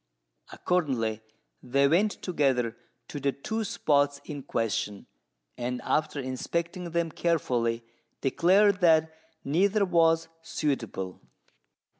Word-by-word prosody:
Accordingly, 125 -11 -1 0.4
they 140 +2 +2
went 195 +8 +3
together 130 - +1 0.3
to 145 - -6
the 140 0 +1
two 220 +12 -3
spots 145 -9 +1
in 145 -3 -6
question; 115 -5 -2 0.5
and 125 +1 -2
after 155 -1 0
inspecting 170 +7 -3
them 170 -1 -1
carefully, 120 -9 0 0.4
declared 190 +8 +3
that 160 -2 +4 0.3
neither 195 +8 +2
was 165 -2 +3
suitable. 115 - -3
150 Hz, 100 wpm, -28 LUFS, 130-170 Hz, 0.5 s, that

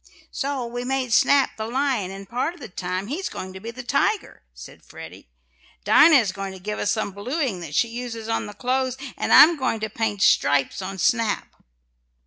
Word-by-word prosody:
"So 275 -3 -3
we 245 +1 -5
made 255 -2 -1
Snap 280 +3 +3
the 220 0 -4
lion, 255 -5 -1
and 195 0 -9
part 250 - -2
of - - -17
the - - -8
time 180 +1 -4
he's 310 - -4
going 185 0 -7
to 190 - -9
be 225 +4 -7
the 245 +1 -8
tiger," 280 - -1
said - - -13
Freddie. - - -12 0.5
"Dinah 315 - +6
is 225 -8 +3
going 195 0 -6
to 190 - -10
give 210 +3 -5
us 205 - 0
some 215 -2 -2
blueing 240 - -3
that 155 -4 -7
she 235 - +3
uses 230 -2 -6
on 225 -1 -2
the 205 - -10
clothes, 260 0 -1 0.2
and - - -3
I'm 325 +2 +8
going 250 -4 -1
to 215 -1 -3
paint 210 -3 -1
stripes 145 +5 +2
on 190 +1 -6
Snap." 230 0 0
230 Hz, 200 wpm, -23 LUFS, 195-260 Hz, 0.5 s, I'm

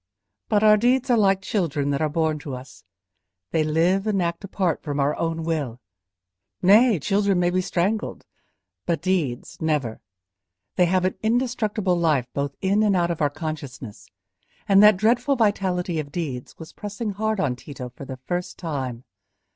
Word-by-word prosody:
But 210 0 +3
our 215 0 +7
deeds 250 +4 +2
are - - +5
like 195 -2 +3
children 155 -9 -1
that 140 - -1
are 155 - +1
born 155 0 0
to 140 -3 -6
us; 130 +1 -12 0.7
they 160 - +2
live 170 +6 +1
and 205 -2 +1
act 170 +1 -2
apart 185 -4 -1
from 145 -2 -3
our 140 +2 +1
own 165 -1 -2
will. 145 -8 -2 0.8
Nay, 210 +4 +5
children 195 +3 +1
may 175 0 +2
be 185 +1 +1
strangled, 195 +4 -2 0.6
but 170 -1 -1
deeds 170 -10 -2
never: 150 -8 -1 0.7
they 180 - +4
have 185 +1 +2
an 185 - +1
indestructible 220 -5 0
life 155 -7 +2
both 140 0 -2
in 200 +2 +2
and 210 -2 +3
out 175 -1 +1
of 165 - -4
our 145 - +3
consciousness; 145 -7 -7 0.6
and 195 -1 +6
that 210 -2 +7
dreadful 240 +7 +2
vitality 190 -7 0
of 145 -2 -5
deeds 140 -7 -5
was 160 - -11
pressing 210 +1 -5
hard 215 +1 -1
on 130 -9 0
Tito 125 -1 -8
for 125 +3 -11
the 130 -1 -7
first 175 +7 -4
time. 130 -8 -4
175 Hz, 170 wpm, -24 LUFS, 150-205 Hz, 0.8 s, our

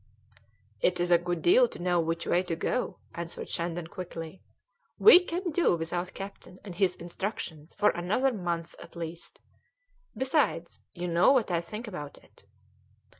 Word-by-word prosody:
"It 180 0 +2
is 175 0 0
a 170 - +7
good 175 -1 -3
deal 485 +7 +6
to - - -11
know 175 0 +1
which 165 0 -1
way 175 - +2
to 175 -3 -3
go," 250 +9 -2 0.2
answered 170 0 -6
Shandon 170 0 -3
quickly. 175 -1 -8 0.6
"We 425 -5 +9
can 355 0 -3
do 325 - +3
without 170 +2 -3
the - - -15
captain 195 -1 -9
and 200 -4 -8
his 180 0 +1
instructions 175 -3 -6
for 210 - +4
another 215 +10 0
month 170 -4 -3
at 170 - -13
least. 170 0 -7 0.8
Besides, 265 - 0
you 175 +1 -3
know 170 +6 +5
what 250 -8 +2
I 170 -1 +1
think 215 +7 -7
about 150 -8 -7
it." - - -22
175 Hz, 165 wpm, -29 LUFS, 170-210 Hz, 0.8 s, We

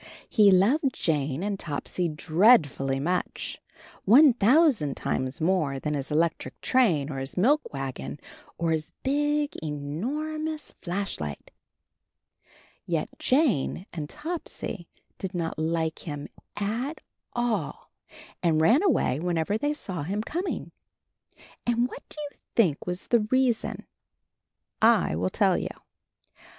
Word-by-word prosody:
He 210 -2 +5
loved 255 +9 +3
Jane 150 -1 0
and 200 -1 -2
Topsy 170 +3 -3
dreadfully 155 - +3
much 175 +6 -2 0.2
— - - -19 0.2
one 265 +6 +7
thousand 240 - +3
times 130 0 -2
more 160 -5 +1
than 150 +2 -2
his 140 -2 -3
electric 160 +2 0
train 170 - +2
or 135 - -4
his 135 +5 -6
milk 280 +11 +3
wagon 130 - -5 0.4
or 165 -1 0
his 155 -1 -2
big 295 +2 +1
e 155 - -3
nor 225 - -3
mous 310 -2 -4
flashlight! 175 - -4 1.3
Yet 165 -3 -1
Jane 255 - +2
and 155 -4 -5
Topsy 300 - -5 0.3
did 190 -1 -5
not 165 -2 -2
like 160 0 -1
him 145 -2 -5 0.3
at 235 +9 -2 0.3
all 230 -10 -2 0.5
and 165 -3 +3
ran 225 - +5
away 285 - +2
whenever 175 +3 0
they 290 +7 0
saw 185 - -5
him 200 +8 -2
com 350 - -3
ing. - - -4 1.0
And 240 +1 +2
what - - -9
do - - -9
you 290 - -9 0.2
think 180 -11 +2
was 180 +1 -2
the 225 -3 +3
reason? 255 -2 +1 1.0
I 225 - +4
will 90 +3 0
tell - - +2
you. - - -3
185 Hz, 130 wpm, -27 LUFS, 150-250 Hz, 1.3 s, one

